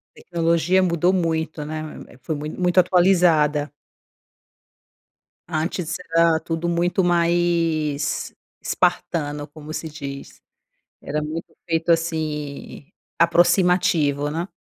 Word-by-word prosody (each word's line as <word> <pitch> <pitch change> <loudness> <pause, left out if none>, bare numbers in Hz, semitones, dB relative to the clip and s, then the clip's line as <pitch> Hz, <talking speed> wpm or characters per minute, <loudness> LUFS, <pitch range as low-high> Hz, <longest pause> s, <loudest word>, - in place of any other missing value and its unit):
Tecnologia 170 +2 +1
mudou 175 0 +2
muito, 160 -4 -1
né? 155 +1 -4
Hã, 155 - -9
eh, - - -17
foi 155 - -3
muito 150 +4 -6
muito 180 0 +3
atualizada. 170 -5 +3 1.7
Antes, 165 +1 -2 0.2
era 165 -1 +4
tudo 165 +1 -3
muito 175 +2 +1
mais 170 -4 +1 0.3
espartano 145 -3 -1
como 155 +1 -10
se 160 - -4
diz. 140 -3 -8 0.6
Era 150 - -3
muito 160 +3 -6
feito 165 -1 -1
assim, 155 -4 -2 0.3
aproximativo, 170 -4 +3
né. 165 +4 -3
165 Hz, 105 wpm, -22 LUFS, 150-175 Hz, 1.7 s, era